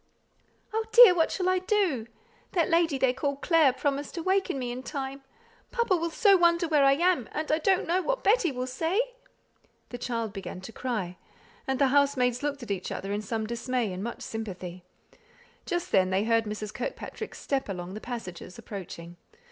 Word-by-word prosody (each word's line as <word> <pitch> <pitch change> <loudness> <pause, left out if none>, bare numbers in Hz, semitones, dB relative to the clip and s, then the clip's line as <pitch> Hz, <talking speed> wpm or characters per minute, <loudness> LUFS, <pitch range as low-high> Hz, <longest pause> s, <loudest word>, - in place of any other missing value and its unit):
"Oh, 445 +1 +1
dear, 475 -5 +10
what 330 -2 +2
shall 365 -1 -1
I 370 0 +3
do? 365 - 0 0.5
That 340 -4 +1
lady 330 -4 +3
they 260 -1 +2
call 280 +2 -1
Clare 310 -1 +4
promised 280 +2 -2
to 335 - -4
waken 380 -5 +1
me 250 -2 -3
in 250 +1 -5
time. 270 +1 -5 0.5
Papa 470 -5 +1
will 335 -1 -1
so 395 +4 +5
wonder 340 -1 +3
where 300 -3 +3
I 275 0 +6
am, 340 -5 +1
and 310 0 -2
I 310 - +3
don't 380 +3 +2
know 355 +3 +1
what - - -1
Betty 405 -6 +3
will 250 -1 -3
say." 320 - -1 0.9
The 245 - -7
child 230 -4 -3
began 195 -2 -6
to 185 - -9
cry, 215 -9 -3 0.5
and 265 0 0
the 270 0 +3
housemaids 260 -3 +2
looked 285 -2 -3
at 220 - -6
each 190 -2 -3
other 195 - -4
in 205 - -1
some 220 +1 -3
dismay 235 -2 -2
and 185 +2 -5
much 235 - -5
sympathy. 185 -5 -6 0.8
Just 350 -2 -2
then, 185 -1 +4
they 190 +2 +1
heard 230 0 +2
Mrs. 210 0 -5
Kirkpatrick's - - -6
step 270 -5 -2
along 180 -1 -5
the 215 - -7
passages, 205 -7 -7
approaching. 175 -6 -8
265 Hz, 190 wpm, -28 LUFS, 220-335 Hz, 0.9 s, dear